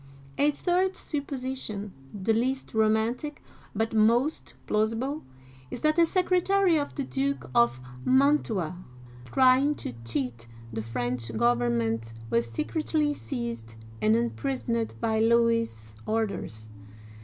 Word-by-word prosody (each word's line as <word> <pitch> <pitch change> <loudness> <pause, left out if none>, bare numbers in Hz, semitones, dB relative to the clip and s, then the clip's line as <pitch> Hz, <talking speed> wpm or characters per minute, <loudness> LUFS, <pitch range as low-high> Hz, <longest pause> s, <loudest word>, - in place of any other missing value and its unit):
A 290 - +5
third 360 +5 +1
supposition 260 - -4
— 135 - -22
the 225 - +3
least 260 +4 -1
romantic, 220 +6 +1 0.3
but 225 +2 0
most 235 +7 +2
plausible 225 +8 0 0.3
— 130 0 -23
is - - -6
that 310 +2 +3
a 335 - +6
secretary 370 +1 +3
of 285 - -4
the 280 - -2
Duke 275 - -2
of 120 +2 +3 0.2
Man'tua, 245 - +2 0.5
try 255 - +5
ing 290 +2 +2
to 125 - -6
cheat 115 -1 -3 0.3
the 110 - -2
French 120 +1 -3
government, 115 -1 +1 0.2
was 115 0 +1
secretly 300 - 0
seized 235 - -5 0.3
and 105 +1 +4
imprisoned 115 -1 -1
by, 220 - +1
Louis's 230 - +2
orders. 200 - -2
220 Hz, 120 wpm, -27 LUFS, -, 0.5 s, a